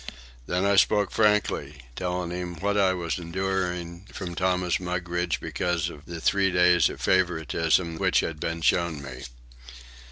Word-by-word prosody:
Then 90 +2 0
I 100 0 +3
spoke 105 +1 +3
frankly, 105 - +1
telling 90 -1 -3
him 90 -1 -4
what 100 +5 -1
I 100 -2 +4
was 85 -1 -3
enduring 90 0 -3
from 90 -3 -6
Thomas 90 -1 0
Mugridge 90 -1 -2
because 85 -2 -1
of 75 0 -13
the 85 0 -7
three 95 +3 +2
days 90 -1 +4
of - - -8
favouritism 85 -2 +1
which - - +3
had 80 -2 -4
been 85 +1 -3
shown 80 -5 +1
me. 65 -2 -8
90 Hz, 150 wpm, -26 LUFS, 85-95 Hz, -, I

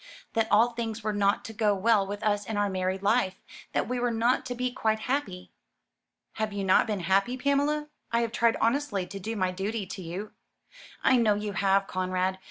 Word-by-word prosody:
"That 225 -1 +1
all 230 +4 +5
things 230 -2 -4
were 215 0 -1
not 200 0 +1
to 225 - -7
go 210 -2 +2
well 200 0 +3
with 205 +1 -5
us 205 -1 0
in 220 - -3
our 205 -1 +1
married 185 +1 -2
life; 200 -3 +2 0.4
that - - 0
we 250 0 -2
were 245 0 +1
not 235 +2 +1
to 245 - -4
be 250 0 -1
quite 220 -3 0
happy." 220 -10 -3 0.9
"Have 220 -1 -1
you 200 -1 -3
not 190 +4 +4
been 210 -3 -2
happy, 195 +8 +1
Pamela? 285 +3 +1 0.2
I 235 0 +2
have 230 -1 -1
tried 235 0 +2
honestly 230 -5 0
to 195 +2 -8
do 220 +4 -4
my 185 -3 0
duty 200 +3 -3
to 190 - -7
you." 185 +5 -6 0.7
"I 260 - +5
know 220 -3 +3
you 210 0 -3
have, 195 0 +2
Conrad. 185 0 -1
210 Hz, 205 wpm, -28 LUFS, 195-235 Hz, 0.9 s, all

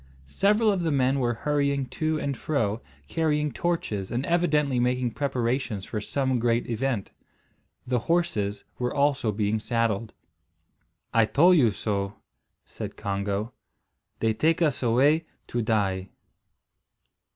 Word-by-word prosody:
Several 210 - +3
of 195 -3 0
the 165 - 0
men 135 -1 +2
were 120 -2 0
hurrying 140 -2 +1
to 155 -1 -1
and 140 -2 -2
fro 115 -8 -1 0.3
carrying 150 - 0
torches 110 - -2
and 125 +3 -1
evidently 150 -6 +2
making 125 0 +1
preparations 125 -4 -1
for 105 - -4
some 130 +2 0
great 115 0 +1
event. 120 -3 -2 0.7
The 125 -1 +1
horses 110 -10 0 0.2
were 125 0 0
also 140 -5 +1
being 105 +1 0
saddled. 115 -1 -1 1.0
"I 115 -1 +5
tole 175 +10 +5
you 135 -10 +5
so," 100 -1 -2 0.5
said - - -7
Congo. 100 +3 -2 0.7
"They 110 -1 +2
take 160 +7 +2
us 155 -6 +1
away 140 +7 +3 0.2
to 120 - -2
die." 100 -4 0
125 Hz, 130 wpm, -26 LUFS, 110-150 Hz, 1.0 s, I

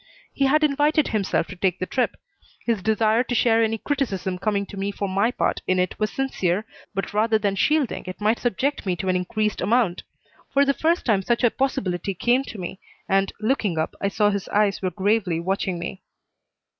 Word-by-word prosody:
He 275 - +1
had 305 +3 +3
invited 295 +1 +2
himself 205 -3 0
to 190 - -7
take 185 0 0
the 185 - -2
trip. 245 +4 -1 0.5
His 230 -4 0
desire 220 +2 +2
to 245 0 -2
share 230 -1 +4
any 225 0 +1
criticism 200 -9 -2
coming 200 +1 0
to 200 - -10
me 200 +1 -2
for 200 0 -3
my 195 +4 +2
part 250 - -1
in 185 - +2
it 180 0 -1
was 215 0 0
sincere, 210 -7 -1 0.3
but 195 +1 -3
rather 220 +1 +3
than 205 -2 0
shielding 290 +3 +1
it 185 - -6
might 215 +2 +2
subject 255 +5 -1
me 180 - +1
to 190 +2 -3
an 185 - +2
increased 210 +3 -1
amount. 210 -2 +2 0.5
For 280 0 +4
the 275 - +3
first 330 +4 +1
time 210 -5 +3
such 235 +5 0
a 240 - +5
possibility 195 -8 -1
came 245 +8 +2
to 225 - -8
me, 185 0 -6 0.3
and, 195 0 +2
looking 215 -7 0
up, 160 - -1
I 200 - +1
saw 205 +1 +2
his 200 -1 -3
eyes 205 -1 +2
were 185 - 0
gravely 195 -3 +1
watching 190 +1 -1
me. 175 +2 -6
210 Hz, 205 wpm, -24 LUFS, 190-240 Hz, 0.5 s, a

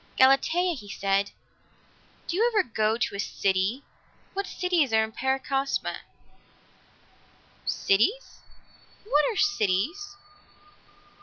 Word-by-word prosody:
"Galatea," 320 +7 +4
he 210 -9 -10
said, 195 0 0 1.0
"do 340 - -3
you 460 +5 +3
ever 425 -3 +3
go 220 -1 0
to 235 - -2
a - - -6
city? 195 +6 0 0.5
What 395 0 -3
cities 350 -8 0
are 220 0 +4
in 220 - -5
Paracosma?" 270 +2 -1 1.7
"Cities? 400 - +1 0.6
What 300 -8 +2
are 430 - -6
cities?" 370 - 0
270 Hz, 100 wpm, -26 LUFS, -, 1.7 s, Galatea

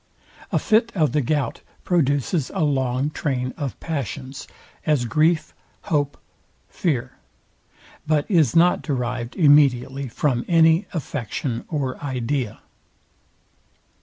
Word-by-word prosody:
A - - +2
fit 225 +1 +2
of 155 -5 +2
the 150 - +1
gout 140 -1 -1 0.2
produces 145 -2 +1
a - - +1
long 135 -1 0
train 130 -4 -2
of 140 -5 -5
passions, 140 -2 -5 0.4
as 150 -6 +1
grief, 155 +7 +1 0.3
hope, 145 -2 0 0.5
fear; 130 -8 -2 0.9
but 150 -2 +2
is 160 - +3
not 175 +2 +4
derived 125 -4 -3
immediately 140 -4 +4
from 120 0 0
any 165 +2 +4
affection 130 - -4
or 140 -4 -3
idea. 130 -3 -2
145 Hz, 105 wpm, -23 LUFS, 130-155 Hz, 0.9 s, not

